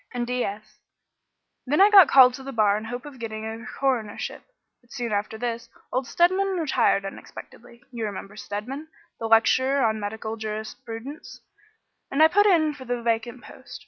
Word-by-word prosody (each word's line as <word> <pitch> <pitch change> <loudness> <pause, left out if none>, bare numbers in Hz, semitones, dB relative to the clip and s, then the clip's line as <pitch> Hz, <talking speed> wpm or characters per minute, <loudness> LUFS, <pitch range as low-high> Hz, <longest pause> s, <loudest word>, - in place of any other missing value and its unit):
and 240 -1 -1
D.Sc. 230 -4 -4 0.9
Then 295 +6 +1
I 405 +2 +7
got 385 -6 +9
called 255 -2 +7
to 265 - -8
the 275 - -6
bar 215 -4 +3
in 210 - -3
the 225 - -8
hope 245 +2 -6
of 280 -4 -11
getting 220 -1 -5
a 225 +1 -6 0.2
coronership, 245 -6 -2 0.4
but 240 - -29
soon 240 -3 -4
after 210 +2 -2
this, 235 0 -4 0.2
old 255 0 -1
Stedman 375 +4 +2
retired 270 - +1
unexpectedly 235 +4 -11
you 235 -2 -5
remember 200 0 -7
Stedman, 240 +9 -6 0.3
the 225 - -3
lecturer 260 +4 +3
on 220 -1 0
medical 220 +2 -5
jurisprudence 225 +5 -7 0.7
and 280 +3 +3
I 320 - +7
put 410 +4 +4
in 315 -6 +3
for 270 - -11
the 245 -1 -3
vacant 235 +2 -2
post. - - -12
240 Hz, 175 wpm, -24 LUFS, 220-275 Hz, 0.9 s, got